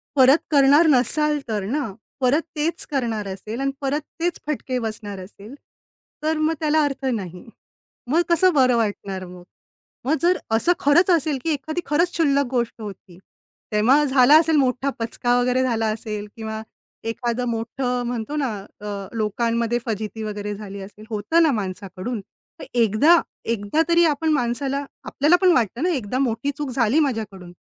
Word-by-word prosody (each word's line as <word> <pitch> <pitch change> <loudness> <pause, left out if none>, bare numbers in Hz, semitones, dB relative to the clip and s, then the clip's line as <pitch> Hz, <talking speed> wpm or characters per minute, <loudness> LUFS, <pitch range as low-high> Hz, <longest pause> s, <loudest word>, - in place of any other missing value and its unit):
परत 270 +2 +7
करणार 290 +3 +6
नसाल 300 +3 +2
तर 210 -3 -2
ना. 255 -1 -2 0.3
परत 260 +5 +3
तेच 315 +3 -1
करणार 230 -7 -1
असेल 210 +5 -6
आणि 275 0 0
परत 280 +2 -1 0.2
तेच 345 0 -1
फटके 265 -3 -2
बसणार 215 -3 -5
असेल 200 +5 -11 0.7
तर 315 0 +1
मग 310 +1 +1
त्याला 310 0 +2
अर्थ 275 -1 -4
नाही. 190 -8 -3 0.7
मग 335 +3 +4
कसं 345 +2 +4
बरं 255 -4 +4
वाटणार 200 -4 -2
मग? 180 0 -12 0.6
मग 280 - +2
जर 355 +1 +3 0.2
असं 230 +11 +3
खरंच 335 +6 +4
असेल 310 -4 +2
की 330 - -1
एखादी 310 +4 -3
खरंच 335 +4 +1
शुल्लक 280 -4 +3
गोष्ट 240 -2 -2
होती. 195 -4 -10 0.5
तेव्हा 245 +8 +4
झाला 270 +2 +6
असेल 325 -1 +2
मोठा 260 0 +1
पचका 245 +2 0
वगैरे 250 +1 +2
झाला 225 -3 0
असेल 210 -1 -5
किंवा 220 -1 -5 0.5
एखादं 240 +1 -2
मोठं 245 +2 -2
म्हणतो 240 +4 -4
ना 275 -5 0 0.3
अ, 210 - -8 0.3
लोकांमध्ये 230 +2 0
फजिती 220 0 -4
वगैरे 210 -1 -4
झाली 200 -1 -8
असेल. 205 +2 -11
होतं 225 +11 +2
ना 315 - +4
माणसाकडून. 200 +1 -4 0.4
तर - - -7
एकदा, 240 - +5 0.3
एकदा 225 +6 0
तरी 340 0 +5
आपण 315 0 +1
माणसाला 275 +2 -1 0.2
आपल्याला 300 +5 +3
पण 370 -1 +6
वाटतं 240 - 0
ना, 360 - +2
एकदा 255 - -2
मोठी 260 +1 0
चूक 295 -2 -3
झाली 245 +4 +2
माझ्याकडून. 215 - -2
250 Hz, 160 wpm, -22 LUFS, 215-295 Hz, 0.7 s, परत